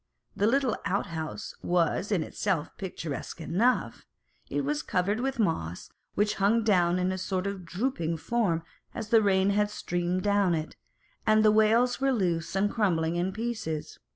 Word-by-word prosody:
The 205 - +2
little 260 -1 +2
outhouse 170 -1 -3
was 175 +4 +1
in 180 -6 +2
itself 170 -5 -2
picturesque 165 -6 -5
enough: 175 - 0 0.5
it 145 - -1
was 145 +1 -1
covered 190 +7 0
with 265 +1 -1
moss, 125 - -1 0.2
which 210 0 +2
hung 220 +4 +3
down 180 -4 +3
in 185 0 +1
a 185 - -3
sort 185 0 -2
of 200 -2 -4
drooping 170 -3 -2
form 180 -4 0 0.3
as 220 -2 -5
the 225 -1 +6
rain 195 -1 +3
had 205 +1 +2
streamed 175 -2 -2
down 200 -4 +3
it, 155 0 -4 0.5
and 215 0 +5
the 215 - +7
wails 225 +4 +3
were 270 0 +3
loose 180 -8 -1
and 200 +1 +2
crumbling 170 -7 +1
in 175 +2 0
pieces. 215 -8 -4
190 Hz, 160 wpm, -28 LUFS, 170-215 Hz, 0.5 s, the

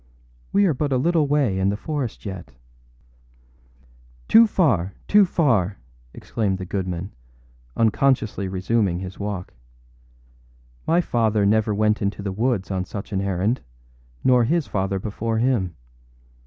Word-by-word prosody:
We 200 0 +4
are 170 - +3
but 145 +2 -2
a 130 - +2
little 160 +2 +2
way 140 -10 +1
in 95 +1 +2
the 100 - -1
forest 140 -3 -4
yet.â 90 -9 -7 1.7
âToo 225 0 +7
far! 100 - +1
too 205 -1 +6
far!â 115 - +1 0.4
exclaimed 100 - -2
the 95 - -6
goodman, 95 0 -4 0.7
unconsciously 115 -3 +1
resuming 95 0 0
his 95 0 -8
walk. 100 -3 -5 1.3
âMy 170 +2 +3
father 110 -6 +1
never 105 +1 +2
went 105 +2 +1
into 100 0 -2
the 100 - -2
woods 105 -1 -1
on 95 -1 -1
such 100 +2 -7
an 95 - 0
errand, 100 +5 0 0.6
nor 125 -2 +4
his 165 +4 +1
father 95 0 -1
before 110 +3 -3
him. 110 -8 0
105 Hz, 135 wpm, -23 LUFS, 95-130 Hz, 1.7 s, âToo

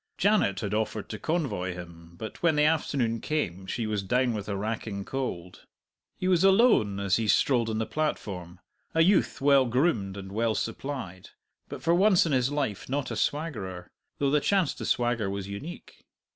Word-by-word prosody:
Janet 200 - +2
had 100 -1 -3
offered 110 -1 -2
to 105 - -6
convoy 135 - -2
him, 85 -1 -11
but 110 +2 -8
when 170 -3 +3
the 150 - +3
afternoon 140 -7 +1
came 95 - -2
she 115 +2 -2
was 105 -2 -1
down 125 +5 +1
with 105 -1 -5
a 100 - -2
racking 105 -1 -4
cold. 90 -10 -5 0.5
He 185 - -2
was 180 -1 +3
alone 195 - +4
as 100 0 +2
he 115 -1 -1
strolled 115 +4 +3
on 110 - -1
the 110 - 0
platform 95 - -3 0.4
a 165 - +5
youth 180 -4 +2
well 140 -1 +5
groomed 115 - +1
and 95 -1 -8
well 110 +1 0
supplied, 115 -7 -5 0.4
but - - -8
for 165 - +3
once 185 0 +5
in 165 - -1
his 130 0 +2
life 140 -10 -2
not 140 0 -2
a - - -2
swaggerer, 100 - -3 0.3
though 140 -1 +1
the 150 - +4
chance 190 -4 +2
to - - -7
swagger 120 -4 +1
was 100 -1 -4
unique. 135 +13 -9
115 Hz, 185 wpm, -28 LUFS, 100-150 Hz, 0.5 s, a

